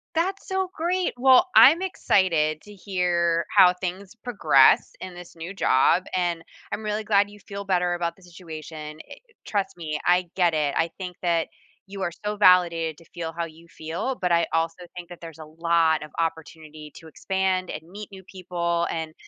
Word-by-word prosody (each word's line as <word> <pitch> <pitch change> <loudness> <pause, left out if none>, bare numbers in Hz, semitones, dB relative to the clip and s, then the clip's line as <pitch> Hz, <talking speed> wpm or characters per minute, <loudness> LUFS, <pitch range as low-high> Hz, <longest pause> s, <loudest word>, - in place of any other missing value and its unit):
That's 375 +4 -1
so 380 -1 -1
great. 355 +2 -1
Well, 265 +8 +5
I'm 280 +10 +8
excited 165 - +1
to 210 - -13
hear 175 -3 0
how 180 -1 +7
things 185 +2 -6
progress 200 - +3
in 185 -1 -8
this 175 -1 -12
new 170 +4 -8
job, 175 +2 +3
and 175 -2 -1 0.3
I'm 220 - -4
really 215 0 -2
glad 205 -1 +2
you 210 - -15
feel 200 0 -8
better 180 -2 +1
about 170 -1 -3
the 190 - -23
situation, 160 -3 -9
i - - -8
it - - -16 0.2
trust 200 -2 -2
me, 155 -3 -4
I 180 0 +2
get 175 -3 +2
it. 150 -2 0
I 165 +1 +1
think 180 -2 -7
that 170 -2 +1 0.4
you 195 -1 -6
are 175 - -1
so 210 0 -2
validated 170 -5 +4
to 170 - -18
feel 165 -1 -5
how 170 - -1
you 165 +1 -15
feel, 165 +11 -4
but 180 -1 0
I 170 0 +3
also 165 +2 -1
think 175 0 -9
that 175 - -11
there's 165 -1 -11
a 155 - -9
lot 165 0 +1
of 150 - -11
opportunity 155 -2 -5
to 165 - -13
expand 190 +2 -1
and 155 - -6
meet 205 +3 -9
new 190 -1 -12
people, 170 -2 -2
and 160 -1 -4
175 Hz, 190 wpm, -24 LUFS, 165-195 Hz, 0.4 s, I'm